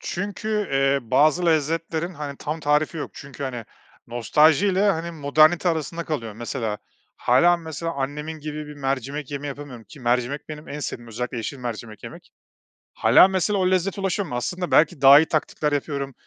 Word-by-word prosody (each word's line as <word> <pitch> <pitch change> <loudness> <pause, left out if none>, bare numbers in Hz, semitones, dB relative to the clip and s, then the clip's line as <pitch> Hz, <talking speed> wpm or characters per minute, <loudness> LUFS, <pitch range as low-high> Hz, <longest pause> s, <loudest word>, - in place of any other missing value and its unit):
Çünkü, 205 +2 -3
eee, 135 0 +3
bazı 155 +6 +3
lezzetlerin, 165 +2 0
hani, 145 -2 -6
tam 155 +2 -4
tarifi 150 +2 +1
yok. 155 - -5
Çünkü, 140 -1 -10
hani, 125 -3 -5 0.4
nostaljiyle, 160 - +3
hani, 170 -1 -3
modernite 155 +3 +3
arasında 165 +1 -2
kalıyor. 115 -8 -4
Mesela, 115 -1 -4 0.4
hâlâ, 170 +8 +4
mesela, 165 0 -5
annemin 150 +3 -4
gibi 150 0 -6
bir 150 - -9
mercimek 135 +1 -3
yemeği 145 0 -4
yapamıyorum. 135 -5 -8
Ki 145 - -15
mercimek 125 +4 -1
benim 150 +1 -9
en 145 - -6
sevdiğim, 120 -3 -6
özellikle 120 +2 -4
yeşil 120 +5 -5
mercimek 115 -3 -7
yemek. - - -11 0.6
Hâlâ, - - +6
mesela, 190 +1 0
o 185 0 +2
lezzete 190 +2 0
ulaşamıyorum. 190 -9 -2
Aslında 180 +8 -3
belki 150 -2 +3
daha 140 +1 +9
iyi 160 - +3
taktikler 150 -1 -1
yapıyorum, 140 -1 -3
150 Hz, 160 wpm, -23 LUFS, 135-165 Hz, 0.6 s, daha